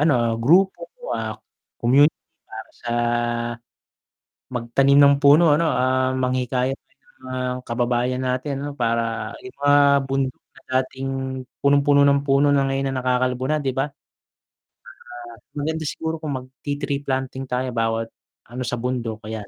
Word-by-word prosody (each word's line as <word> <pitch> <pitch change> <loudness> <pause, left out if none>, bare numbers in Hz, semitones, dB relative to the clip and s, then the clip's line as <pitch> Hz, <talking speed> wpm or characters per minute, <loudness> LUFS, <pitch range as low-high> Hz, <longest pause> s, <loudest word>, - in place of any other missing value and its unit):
ano, 150 -2 +4 0.3
grupo, 190 - +3 0.2
ah, - - -3 0.4
community 140 +6 +4 0.3
para - - -10
sa 120 - -7 1.6
magtanim 130 +3 +2
ng 140 0 +7
puno 150 +2 +6
ano, 160 +2 +2
ah, 130 -1 +1
manghikayat 130 +1 -1
ng 135 0 -39 0.3
mga 130 - -4 0.3
kababayan 120 +1 0
natin 130 +2 -2
'no. 145 - -4
Para 115 -1 -1
yung 190 -5 -12
mga 145 0 +5 0.3
bundok 135 -1 -1 0.2
na - - -16 0.2
dating 135 +1 -6 0.6
punong-puno 140 0 +4
ng 140 0 +3
puno 140 +1 +3
na 140 - +3
ngayon 135 0 -1
na - - -2
nakakalbo 125 0 0
na, 155 - +2
'di 135 -2 -1
ba? 135 - +1
Tsaka - - -51 1.5
maganda 160 +2 -2
siguro 160 +2 -3
kung 150 -4 -3
magti-tree 140 +2 -4
planting 130 0 -2
tayo 125 +1 -1
bawat 115 0 -1 0.4
ano 125 +1 -4
sa 125 - -1
bundok 115 -3 -3
kaya 110 0 -5
130 Hz, 140 wpm, -22 LUFS, 125-145 Hz, 1.6 s, ng